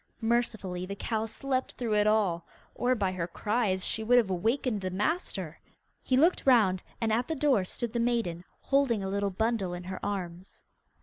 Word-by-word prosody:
Mercifully, 225 Hz, -6 st, -1 dB
the 200 Hz, +2 st, -5 dB
cow 220 Hz, +2 st, -2 dB
slept 260 Hz, +4 st, -2 dB
through 235 Hz, -3 st, -2 dB
it 210 Hz, 0 st, +3 dB
all, 200 Hz, -6 st, +2 dB, 0.3 s
or 250 Hz, +1 st, +1 dB
by 195 Hz, -5 st, 0 dB
her 175 Hz, -2 st, -3 dB
cries 205 Hz, 0 st, 0 dB
she 220 Hz, -, -2 dB
would 245 Hz, +3 st, +4 dB
have 220 Hz, -6 st, +3 dB
awakened 225 Hz, +4 st, 0 dB
the 185 Hz, -, -2 dB
master. 210 Hz, -, -2 dB, 0.4 s
He 255 Hz, -, +1 dB
looked 330 Hz, +6 st, +4 dB
round, 210 Hz, -8 st, +4 dB, 0.2 s
and 225 Hz, -2 st, +1 dB
at 240 Hz, +3 st, +1 dB
the 320 Hz, -, -2 dB
door 270 Hz, -8 st, +3 dB
stood 235 Hz, +4 st, -3 dB
the 235 Hz, -, 0 dB
maiden, 230 Hz, -8 st, 0 dB, 0.2 s
holding 270 Hz, -7 st, +2 dB
a 190 Hz, -, -2 dB
little 200 Hz, +1 st, 0 dB
bundle 200 Hz, -2 st, -1 dB
in 175 Hz, -, -7 dB
her 185 Hz, +1 st, -7 dB
arms. 185 Hz, -2 st, -5 dB
215 Hz, 185 wpm, -29 LUFS, 190-240 Hz, 0.4 s, would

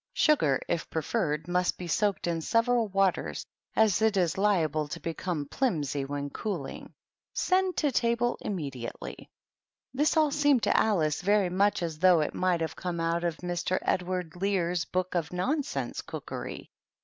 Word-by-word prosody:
Sugar, 155 Hz, -, +3 dB
if 170 Hz, -1 st, -2 dB
preferred, 160 Hz, -1 st, -1 dB
must 180 Hz, 0 st, +1 dB
be 180 Hz, -, -6 dB
soaked 200 Hz, +3 st, +1 dB
in 170 Hz, -1 st, -1 dB
several 230 Hz, +4 st, +2 dB
waters, 195 Hz, -1 st, 0 dB, 0.3 s
as 220 Hz, -2 st, +3 dB
it 220 Hz, -2 st, +3 dB
is 180 Hz, -2 st, +2 dB
liable 165 Hz, -7 st, +1 dB
to 155 Hz, +3 st, -6 dB
become 165 Hz, -1 st, -3 dB
plimsy 145 Hz, -, -1 dB
when 145 Hz, 0 st, -4 dB
cooling. 180 Hz, -11 st, -5 dB, 0.4 s
Send 370 Hz, 0 st, +1 dB
to 295 Hz, -3 st, +2 dB
table 240 Hz, 0 st, +1 dB
immediately.^^ 135 Hz, -, -5 dB, 0.7 s
This 295 Hz, +4 st, +2 dB
all 305 Hz, -2 st, +4 dB
seemed 290 Hz, -4 st, +3 dB
to -, -, +2 dB
Alice 165 Hz, -9 st, +2 dB
very 200 Hz, 0 st, +3 dB
much 200 Hz, 0 st, +2 dB
as 160 Hz, -2 st, -4 dB
though 180 Hz, -2 st, +6 dB
it 150 Hz, -, -1 dB
might 180 Hz, -2 st, +1 dB
have 160 Hz, -2 st, -2 dB
come 175 Hz, -2 st, -4 dB
out 165 Hz, +1 st, 0 dB
of 170 Hz, -2 st, -1 dB
Mr. 175 Hz, +1 st, -1 dB
Edward 180 Hz, -2 st, -1 dB
Lear's 180 Hz, -3 st, +1 dB
book 185 Hz, 0 st, -2 dB
of 170 Hz, -4 st, -1 dB
Nonsense 265 Hz, -, -2 dB
Cookery. -, -, -7 dB
180 Hz, 155 wpm, -28 LUFS, 165-215 Hz, 0.7 s, though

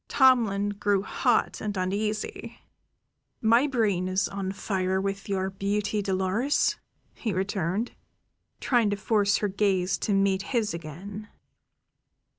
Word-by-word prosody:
Tomlin 230 Hz, -7 st, +4 dB
grew 205 Hz, -1 st, 0 dB
hot 245 Hz, +1 st, +1 dB
and 205 Hz, -2 st, -3 dB
uneasy. 210 Hz, +3 st, -3 dB, 0.8 s
"My 230 Hz, +5 st, +4 dB
brain 210 Hz, -9 st, +1 dB
is 185 Hz, +2 st, +1 dB
on 195 Hz, -1 st, -4 dB
fire 190 Hz, -1 st, -1 dB
with 195 Hz, +1 st, -3 dB
your 190 Hz, -1 st, -1 dB
beauty, 205 Hz, +2 st, -1 dB
Dolores," 195 Hz, +8 st, +1 dB, 0.4 s
he 225 Hz, -, -3 dB
returned, 190 Hz, +3 st, -1 dB, 0.7 s
trying 240 Hz, -5 st, +2 dB
to 205 Hz, -, 0 dB
force 205 Hz, -1 st, +2 dB
her 210 Hz, -, 0 dB
gaze 190 Hz, -2 st, +1 dB
to 205 Hz, -, 0 dB
meet 195 Hz, -1 st, +2 dB
his 215 Hz, -2 st, -1 dB
again. 180 Hz, +6 st, -7 dB
200 Hz, 120 wpm, -27 LUFS, 190-215 Hz, 0.8 s, Tomlin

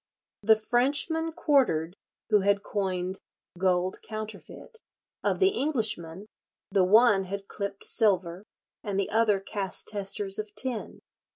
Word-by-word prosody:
The 220 Hz, +1 st, +5 dB
Frenchman 285 Hz, +9 st, +1 dB
quartered 255 Hz, -, +1 dB, 0.4 s
who 210 Hz, -, +6 dB
had 200 Hz, +1 st, +1 dB
coined 190 Hz, -2 st, -3 dB, 0.4 s
gold 185 Hz, 0 st, 0 dB
counterfeit; 215 Hz, -, -9 dB, 0.4 s
of -, -, +1 dB
the 390 Hz, +1 st, +3 dB
Englishmen, 215 Hz, -, -1 dB, 0.5 s
the 190 Hz, -1 st, +3 dB
one 210 Hz, 0 st, +5 dB
had 195 Hz, +1 st, -6 dB
clipped 200 Hz, -1 st, -5 dB
silver, 185 Hz, -5 st, +1 dB, 0.4 s
and 200 Hz, -2 st, -2 dB
the 200 Hz, -, -2 dB
other 215 Hz, -2 st, +3 dB
cast 195 Hz, -1 st, 0 dB
testers 200 Hz, -1 st, -1 dB
of 210 Hz, 0 st, -6 dB
tin." 240 Hz, 0 st, -3 dB
205 Hz, 120 wpm, -27 LUFS, 190-225 Hz, 0.5 s, who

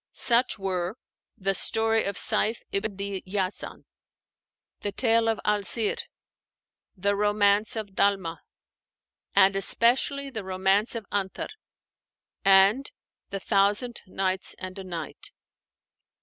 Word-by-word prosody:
Such 240 Hz, 0 st, +3 dB
were 190 Hz, +1 st, -3 dB, 0.4 s
the 195 Hz, 0 st, 0 dB
'Story 225 Hz, +2 st, +3 dB
of 200 Hz, -, -2 dB
Saif 220 Hz, +5 st, +1 dB
ibn 200 Hz, 0 st, -2 dB
dhi 200 Hz, -1 st, -4 dB
Yázan,' 190 Hz, 0 st, -4 dB, 1.0 s
the 205 Hz, -, -2 dB
'Tale 225 Hz, +1 st, +2 dB
of 225 Hz, -, -1 dB
al 210 Hz, 0 st, +2 dB
Zir,' 215 Hz, +2 st, +1 dB, 1.0 s
the 200 Hz, +2 st, +1 dB
'Romance 205 Hz, +1 st, +2 dB
of 215 Hz, -2 st, -4 dB
Dálhmah,' 190 Hz, -4 st, 0 dB, 1.0 s
and 195 Hz, 0 st, +5 dB
especially 265 Hz, +7 st, +2 dB
the 220 Hz, -5 st, -5 dB
'Romance 190 Hz, +4 st, +1 dB
of 225 Hz, -3 st, -5 dB
Antar' 195 Hz, -2 st, -3 dB, 0.9 s
and 195 Hz, +7 st, +5 dB, 0.4 s
the 195 Hz, -, -4 dB
'Thousand 205 Hz, +5 st, 0 dB
Nights 190 Hz, 0 st, -2 dB
and 185 Hz, +1 st, -8 dB
A -, -, -6 dB
Night.' 170 Hz, -4 st, -6 dB
200 Hz, 115 wpm, -26 LUFS, 190-220 Hz, 1.0 s, and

